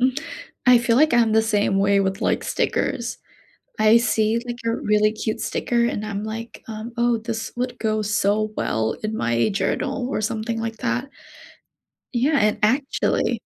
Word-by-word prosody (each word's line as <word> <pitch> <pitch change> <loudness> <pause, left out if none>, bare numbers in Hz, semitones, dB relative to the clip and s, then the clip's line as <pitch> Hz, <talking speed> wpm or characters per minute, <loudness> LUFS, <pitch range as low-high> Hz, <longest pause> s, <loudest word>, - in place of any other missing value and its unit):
Mm-mm 255 +3 +2 0.5
I 250 -1 +8
feel 235 -1 +1
like 310 +2 +4
I'm 230 -2 +4
the 220 0 +4
same 205 -3 +1
way 200 0 +3
with, 190 0 -1
like, - - 0
stickers. 235 -1 -1 0.6
I 215 +1 +6
see, 225 -1 +1
like, 240 - -4
a 230 - +1
really 210 -5 +2
cute 220 0 -3
sticker, 235 -1 0
and 215 -3 -2
I'm 205 -1 -4
like, 225 +2 -7
um 220 +2 -7
"Oh, 240 -1 +2
this 225 0 -4
would 250 0 -2
go 215 -1 0
so 210 +1 +1
well 110 0 0
in 215 +1 -2
my 115 - +1
journal 250 +5 -1
or 215 - -1
something 220 +1 -2
like 225 0 -4
that. 250 +3 -2 1.0
Yeah. 275 +5 +2
And, 210 -3 +2
actually" 265 +6 +1
225 Hz, 170 wpm, -22 LUFS, 215-240 Hz, 1.0 s, I